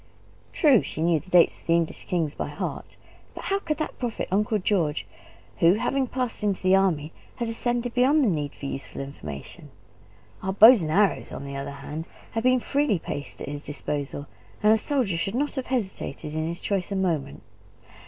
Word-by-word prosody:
True, 280 Hz, -, +5 dB
she -, -, -7 dB
knew 170 Hz, -2 st, +3 dB
the 185 Hz, -, -16 dB
dates 180 Hz, -2 st, +5 dB
of -, -, -24 dB
the 165 Hz, -, +4 dB
English 170 Hz, -1 st, -2 dB
kings 165 Hz, -5 st, 0 dB
by -, -, -4 dB
heart; -, -, -5 dB, 0.4 s
but -, -, -7 dB
how 390 Hz, 0 st, 0 dB
could 305 Hz, -6 st, -2 dB
that 310 Hz, -, -4 dB
profit 240 Hz, -3 st, -3 dB
Uncle 210 Hz, +3 st, +2 dB
George, 180 Hz, -7 st, 0 dB, 0.5 s
who, 170 Hz, +3 st, +6 dB
having 265 Hz, +4 st, 0 dB
passed 250 Hz, -4 st, -3 dB
into 200 Hz, -3 st, 0 dB
the 185 Hz, +1 st, +5 dB
army, 165 Hz, -6 st, +1 dB, 0.2 s
had 235 Hz, -, -3 dB
ascended 240 Hz, +1 st, -1 dB
beyond 275 Hz, +5 st, +4 dB
the -, -, +3 dB
need 150 Hz, -6 st, -1 dB
of -, -, -18 dB
useful 135 Hz, 0 st, -5 dB
information? 75 Hz, -, -8 dB, 0.7 s
Our 190 Hz, 0 st, -2 dB
bows 220 Hz, +2 st, +9 dB
and 155 Hz, -1 st, -2 dB
arrows, 200 Hz, +4 st, +2 dB
on -, -, -6 dB
the 140 Hz, 0 st, -6 dB
other 140 Hz, 0 st, -4 dB
hand, 150 Hz, +3 st, -7 dB, 0.2 s
had 225 Hz, -, -1 dB
been 255 Hz, +1 st, +4 dB
freely 275 Hz, -4 st, +1 dB
placed 145 Hz, -3 st, -6 dB
at -, -, -6 dB
his 145 Hz, +1 st, -6 dB
disposal; 145 Hz, -1 st, -4 dB, 0.4 s
and 210 Hz, +1 st, +7 dB
a -, -, +6 dB
soldier 220 Hz, -, 0 dB
should 195 Hz, +5 st, -2 dB
not 290 Hz, +3 st, 0 dB
have 265 Hz, -2 st, -4 dB
hesitated 190 Hz, -, -3 dB
in 155 Hz, 0 st, -1 dB
his 170 Hz, +1 st, -5 dB
choice 195 Hz, -2 st, -1 dB
a -, -, -1 dB
moment. 165 Hz, -8 st, -1 dB
190 Hz, 195 wpm, -26 LUFS, 155-240 Hz, 0.7 s, bows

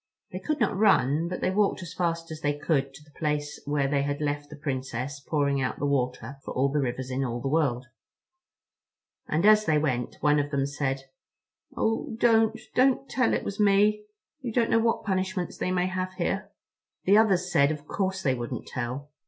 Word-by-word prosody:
They 185 Hz, -, -5 dB
could 305 Hz, +7 st, -2 dB
not 225 Hz, -5 st, +1 dB
run, 165 Hz, -, +3 dB
but 180 Hz, -, -5 dB
they -, -, +1 dB
walked 200 Hz, -1 st, +1 dB
as 170 Hz, -, -8 dB
fast 165 Hz, -2 st, -2 dB
as 155 Hz, 0 st, -7 dB
they 145 Hz, -1 st, 0 dB
could 140 Hz, -3 st, 0 dB
to 150 Hz, -, -13 dB
the 150 Hz, -, -22 dB
place 150 Hz, -1 st, -2 dB
where 145 Hz, -1 st, +1 dB
they 140 Hz, 0 st, +1 dB
had 145 Hz, 0 st, -2 dB
left 145 Hz, -1 st, -2 dB
the 150 Hz, -, -9 dB
Princess 135 Hz, -1 st, -4 dB
pouring 140 Hz, -1 st, 0 dB
out 130 Hz, -, -2 dB
the -, -, -2 dB
water 135 Hz, 0 st, -1 dB
for -, -, -7 dB
all 135 Hz, +2 st, +2 dB
the 150 Hz, +2 st, 0 dB
rivers 130 Hz, -1 st, -2 dB
in 130 Hz, +1 st, -1 dB
all 120 Hz, -2 st, -2 dB
the 135 Hz, -, -3 dB
world. 135 Hz, -4 st, +1 dB, 1.4 s
And 160 Hz, +5 st, +1 dB
as 215 Hz, 0 st, +6 dB
they 155 Hz, -1 st, +3 dB
went, 130 Hz, -5 st, -1 dB
one 150 Hz, 0 st, +3 dB
of 145 Hz, 0 st, -1 dB
them 140 Hz, -2 st, 0 dB
said, 140 Hz, -1 st, -2 dB, 0.7 s
"Oh 225 Hz, 0 st, -1 dB
don't, 225 Hz, -2 st, +4 dB
don't 265 Hz, +1 st, +3 dB
tell 255 Hz, -3 st, +1 dB
it -, -, -2 dB
was 200 Hz, -, -5 dB
me. 210 Hz, +1 st, +3 dB, 0.4 s
You 250 Hz, -3 st, -4 dB
don't 230 Hz, 0 st, +1 dB
know 225 Hz, -, +5 dB
what 230 Hz, 0 st, 0 dB
punishments 190 Hz, -2 st, -2 dB
they -, -, -1 dB
may 180 Hz, -1 st, +1 dB
have 185 Hz, 0 st, -3 dB
here." 195 Hz, +2 st, -2 dB, 0.5 s
The 200 Hz, +3 st, +6 dB
others 185 Hz, -5 st, +2 dB
said 140 Hz, -4 st, +4 dB
of 150 Hz, -1 st, -4 dB
course 190 Hz, +2 st, -2 dB
they 130 Hz, -, +2 dB
wouldn't 120 Hz, -2 st, -5 dB
tell. 130 Hz, +4 st, -5 dB
150 Hz, 200 wpm, -27 LUFS, 140-190 Hz, 1.4 s, as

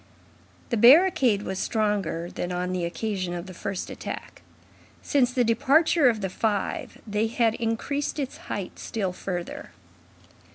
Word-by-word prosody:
The 235 Hz, -, +2 dB
barricade 250 Hz, -, +6 dB
was 190 Hz, 0 st, -4 dB
stronger 205 Hz, -6 st, -1 dB
than 175 Hz, -, -4 dB
on 180 Hz, 0 st, -2 dB
the 180 Hz, -2 st, -1 dB
occasion 185 Hz, -1 st, -3 dB
of 175 Hz, 0 st, -5 dB
the 185 Hz, -, -9 dB
first 195 Hz, +1 st, -4 dB
attack. -, -, -7 dB, 0.6 s
Since 255 Hz, -4 st, +2 dB
the 250 Hz, -1 st, +2 dB
departure 280 Hz, +6 st, +4 dB
of 220 Hz, -3 st, -1 dB
the 190 Hz, -, -2 dB
five, 205 Hz, 0 st, -2 dB
they 210 Hz, +1 st, 0 dB
had 230 Hz, 0 st, +2 dB
increased 235 Hz, +7 st, -2 dB
its 275 Hz, -3 st, -3 dB
height 195 Hz, -3 st, -5 dB
still 195 Hz, -5 st, -3 dB
further. 180 Hz, -1 st, -5 dB
215 Hz, 140 wpm, -26 LUFS, 185-245 Hz, 0.6 s, barricade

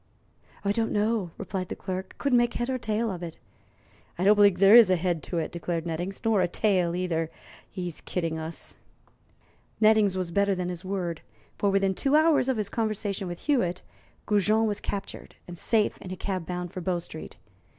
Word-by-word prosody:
"Don't 225 Hz, +3 st, +1 dB
know," 210 Hz, -3 st, 0 dB
replied 190 Hz, -2 st, -4 dB
the -, -, -4 dB
clerk. 185 Hz, 0 st, -5 dB
"Couldn't 265 Hz, -4 st, +3 dB
make 240 Hz, 0 st, +1 dB
head 240 Hz, +1 st, -2 dB
nor 260 Hz, -1 st, -1 dB
tail 220 Hz, 0 st, -1 dB
of 180 Hz, -2 st, -6 dB
it." 170 Hz, -2 st, -7 dB, 0.8 s
"I 175 Hz, -, -1 dB
don't 205 Hz, +2 st, +7 dB
believe 205 Hz, -3 st, +5 dB
there 195 Hz, +2 st, +6 dB
is 230 Hz, -4 st, +9 dB
a 185 Hz, -, +4 dB
head 175 Hz, -2 st, -1 dB
to 175 Hz, -, -4 dB
it," 160 Hz, -, -2 dB
declared 170 Hz, -1 st, -3 dB
Nettings; 175 Hz, +4 st, -4 dB
"nor 220 Hz, -4 st, +3 dB
a 180 Hz, -, +2 dB
tail 180 Hz, -3 st, +1 dB
either. 165 Hz, -3 st, -1 dB, 0.4 s
He's 180 Hz, -3 st, -5 dB
kidding 165 Hz, -3 st, -2 dB
us." 160 Hz, +1 st, -7 dB, 1.0 s
Nettings 215 Hz, -3 st, +4 dB
was 180 Hz, -2 st, -2 dB
better 200 Hz, +2 st, +2 dB
than 180 Hz, -1 st, -3 dB
his 175 Hz, 0 st, -6 dB
word, 180 Hz, -4 st, -3 dB, 0.4 s
for 205 Hz, -, +2 dB
within 195 Hz, 0 st, +2 dB
two 275 Hz, +9 st, +1 dB
hours 310 Hz, -4 st, +4 dB
of 260 Hz, -, +1 dB
his 210 Hz, -2 st, -1 dB
conversation 210 Hz, -3 st, -2 dB
with 175 Hz, -1 st, -6 dB
Hewitt, 185 Hz, -, 0 dB, 0.4 s
Goujon 210 Hz, +2 st, +3 dB
was 210 Hz, -2 st, -1 dB
captured 200 Hz, -1 st, -6 dB
and 175 Hz, -, -8 dB
safe 215 Hz, +5 st, +1 dB
in 185 Hz, -, -8 dB
a 185 Hz, -, -4 dB
cab 185 Hz, -2 st, -3 dB
bound 180 Hz, -1 st, -4 dB
for 185 Hz, -, -5 dB
Bow 180 Hz, 0 st, 0 dB
Street. 165 Hz, -2 st, -9 dB
190 Hz, 190 wpm, -27 LUFS, 175-215 Hz, 1.0 s, is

